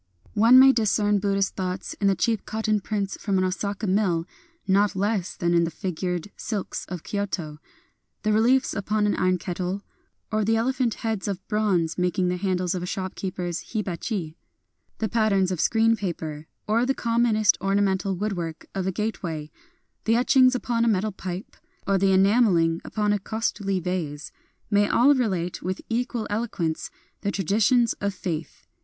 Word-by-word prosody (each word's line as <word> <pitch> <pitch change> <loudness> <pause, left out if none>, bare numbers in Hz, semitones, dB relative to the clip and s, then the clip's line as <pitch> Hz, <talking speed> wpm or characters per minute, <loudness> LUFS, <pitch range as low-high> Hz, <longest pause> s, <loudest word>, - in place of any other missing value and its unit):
One 230 +4 +6
may 265 +1 +9
discern 210 -3 +2
Buddhist 195 0 0
thoughts 185 -1 -3
in 200 - +3
the 195 - +3
cheap 225 +2 0
cotton 215 -1 0
prints 200 -1 -2
from 200 -3 0
an 185 - +2
Osaka 200 +3 -2
mill 185 -4 +1 0.4
not 200 +1 +3
less 200 -1 -1
than 175 0 +1
in 170 0 +4
the 165 - 0
fig 175 +1 -5
ured 180 +1 -2
silks 210 -4 -4
of 180 -3 -6
Kyoto. 180 -7 -3 0.6
The 215 -1 +2
reliefs 245 +5 +3
upon 210 +1 0
an 205 - +1
iron 185 0 +2
kettle, 180 +2 -4 0.5
or 215 0 +1
the 225 +2 +2
elephant 245 0 0
heads 220 -3 -1
of 195 -1 -4
bronze 195 -7 0
making 180 0 +1
the 180 - -1
handles 185 -1 0
of 180 - -3
a 180 - -4
shopkeeper's 185 -1 -4
hiba 200 -5 -1
chi; 165 -7 -4 0.3
— - - -47
the 220 - -1
patterns 205 -5 +2
of 180 - -1
screen 225 0 +3
paper, 160 -6 -5 0.2
or 225 +3 +2
the 270 +2 +1
commonest 230 -2 +3
ornamental 195 0 +1
woodwork 175 -5 -4
of 190 -1 -2
a - - +1
gate 215 +4 -3
way; 155 -4 -5 0.3
— - - -48
the 225 - +3
etchings 255 +1 +5
upon 240 -2 0
a - - +2
metal 215 -1 +1
pipe, 185 0 -7 0.3
or 195 -1 +2
the 195 0 +3
enameling 190 -4 +3
upon 210 -1 0
a 205 - 0
costly 200 -2 -2
vase, 165 -5 -4 0.2
— - - -42
may 205 0 +4
all 275 +4 +5
relate, 190 -10 -1
with 185 +2 -3
equal 235 -1 -1
eloquence, 205 -7 -2 0.3
the 200 - -1
traditions 210 +5 +2
of 200 -1 -1
faith. 165 -4 -5
200 Hz, 175 wpm, -25 LUFS, 180-220 Hz, 0.6 s, may